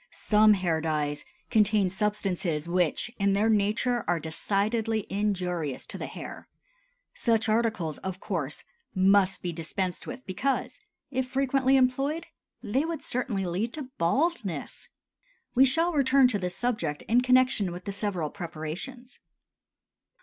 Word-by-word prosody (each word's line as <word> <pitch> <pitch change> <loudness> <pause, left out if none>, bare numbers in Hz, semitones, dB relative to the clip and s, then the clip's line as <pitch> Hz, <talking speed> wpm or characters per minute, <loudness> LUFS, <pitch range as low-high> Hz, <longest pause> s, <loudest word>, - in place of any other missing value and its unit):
Some 215 - +4
hair 170 -4 0
dyes 150 -2 -2 0.3
contain 210 -3 +3
substances 190 -6 -1
which 180 +5 0
in 200 0 +3
their 210 +3 +2
nature 220 +4 +1
are 175 -1 +1
decidedly 210 +7 -1
injurious 180 -8 -1
to - - -6
the - - -4
hair; - - -8 0.7
such 230 - +1
articles, 215 -8 0
of 190 0 -5
course, 155 -9 -3 0.3
must 195 0 +3
be 175 -1 -2
dispensed 175 +2 -3
with 260 +1 -7
because, 205 +9 -2 0.3
if 260 -1 -1
frequently 270 0 +2
employed, 270 +5 +1 0.4
they 250 +6 +1
would 325 -3 -4
certainly 235 -7 -1
lead 190 +7 -2
to 275 -4 -7
baldness. 200 - -1 0.6
We 265 +2 +6
shall 330 +6 +2
return 275 -2 +5
to 210 -5 -1
this 180 -1 -3
subject 195 -12 -1
in 240 +2 +3
connection 255 -6 +3
with 175 +1 -8
the 200 - -3
several 195 -6 -2
preparations. 180 - -7
205 Hz, 135 wpm, -28 LUFS, 180-250 Hz, 0.7 s, We